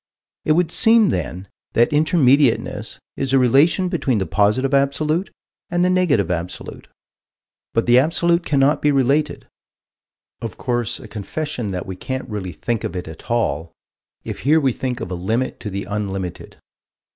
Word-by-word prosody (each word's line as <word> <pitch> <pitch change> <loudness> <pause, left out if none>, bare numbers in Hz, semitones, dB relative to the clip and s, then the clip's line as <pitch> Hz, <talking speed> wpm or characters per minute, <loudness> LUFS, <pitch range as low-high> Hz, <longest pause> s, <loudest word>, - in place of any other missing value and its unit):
It 155 - +4
would 165 0 +1
seem 225 -1 +5
then 90 +3 -3 0.3
that 120 +6 +3
Intermediateness 145 -4 +2 0.2
is 135 -1 -2
a - - +6
relation 140 +9 +4
between 155 - 0
the 95 - 0
Positive 110 +8 +1
Absolute 150 +6 +1 0.4
and 175 +1 +1
the 180 - +2
Negative 150 - +2
Absolute. 90 +1 -5 0.9
But 115 - +2
the 120 +1 +6
absolute 170 +4 +1
cannot 145 0 +2
be 150 - +3
the 145 - +2
related 140 +3 +1 1.0
of 115 -4 -6
course 120 -4 -1
a - - -11
confession 120 +3 -4
that 90 -2 -4
we 95 - -6
can't 130 +7 -5
really 100 -4 -5
think 110 +7 -3
of 85 - -4
it 90 -2 -5
at 80 0 -11
all, 85 -9 -1 0.5
if - - -6
here 155 +5 +3
we 135 -5 +1
think 125 -1 -4
of 90 - -5
a - - -1
limit 110 +9 -2
to 105 - -5
the 100 0 -4
unlimited. 95 -3 -5
130 Hz, 165 wpm, -20 LUFS, 100-155 Hz, 1.0 s, a